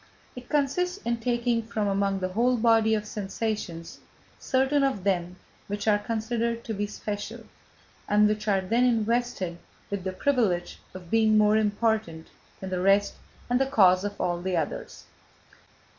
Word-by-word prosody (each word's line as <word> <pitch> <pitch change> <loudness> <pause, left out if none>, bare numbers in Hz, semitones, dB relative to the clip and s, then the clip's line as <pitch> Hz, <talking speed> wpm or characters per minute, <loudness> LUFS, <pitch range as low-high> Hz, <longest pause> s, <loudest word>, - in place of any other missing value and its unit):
It 250 -1 -10
consists 310 +6 0
in 235 0 0
taking 235 0 0
from 220 -2 -2
among 195 -1 0
the 185 - -1
whole 240 +6 +2
body 225 -1 +4
of 210 -1 -3
sensations 205 -5 -4 0.4
certain 270 +2 +1
of 265 -9 0
them 180 -2 0 0.3
which 205 +1 -4
are 205 -1 +4
considered 230 +1 -2
to 225 - -4
be 205 0 -2
special, 205 0 -6 0.7
and 210 0 +5
which 210 0 -2
are 195 -2 +2
then 230 +6 +1
invested 230 -6 0 0.3
with 200 -2 -3
the 190 - -2
privilege 195 -7 0 0.2
of 180 -2 -10
being 220 -1 +4
more 210 0 +4
important 215 -6 0 0.3
than 190 -1 -6
the 180 -1 -1
rest 200 +2 +3 0.3
and 245 +2 +1
the 270 - +2
causes 190 -7 +4
of 205 0 -5
all 175 -1 -1
the 185 -1 -1
others. 155 -3 -4
215 Hz, 160 wpm, -26 LUFS, 195-235 Hz, 0.7 s, and